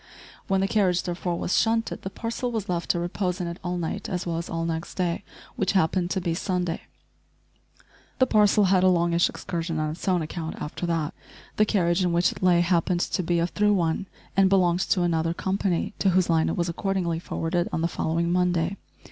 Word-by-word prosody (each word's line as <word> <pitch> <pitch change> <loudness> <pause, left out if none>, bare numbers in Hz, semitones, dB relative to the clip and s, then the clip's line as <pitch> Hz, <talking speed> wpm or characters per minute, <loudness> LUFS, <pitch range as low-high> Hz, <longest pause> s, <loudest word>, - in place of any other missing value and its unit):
When 195 -1 +2
the 195 - +2
carriage 190 -4 +2
therefore 175 0 -2
was 175 - -1
shunted 225 0 +1
the 190 - -5
parcel 230 +4 -3
was 220 -4 -3
left 175 -1 -2
to 175 - +2
repose 180 +1 -2
in 180 - -2
it 170 +1 -5
all 180 0 -2
night 175 +4 -3
as 180 -1 -2
well 165 -1 -1
as 170 - -6
all 165 0 -2
next 165 0 -4
day, 180 0 -1 0.3
which 195 -5 +1
happened 180 -1 +2
to 190 - 0
be 175 -2 -1
Sunday. 180 -1 -2 1.4
The 260 - +4
parcel 210 -3 +4
had 185 -1 +4
a - - +6
longish 170 -1 +3
excursion 165 -2 -4
on 155 0 -1
its 160 - -8
own 180 -3 +2
account 160 +1 -5
after 165 +3 -4
that. 165 -3 -1 0.4
The 215 - +5
carriage 180 -3 +2
in 175 -1 +1
which 175 +1 +3
it - - -10
lay 180 -2 +4
happened 175 0 +1
to - - 0
be 175 0 0
a 170 - +2
"through 210 +3 +2
one," 170 +1 0 0.3
and 195 -1 +5
belonged 180 -3 +3
to 180 - +2
another 165 -1 0
company, 190 -1 -1
to 195 - +3
whose 180 -1 +2
line 160 -1 +3
it - - -2
was 170 -1 0
accordingly 175 -1 -1
forwarded 175 +1 -2
on 160 - -1
the 165 - +2
following 170 +1 -1
Monday. 180 +1 +1
175 Hz, 210 wpm, -25 LUFS, 170-190 Hz, 1.4 s, a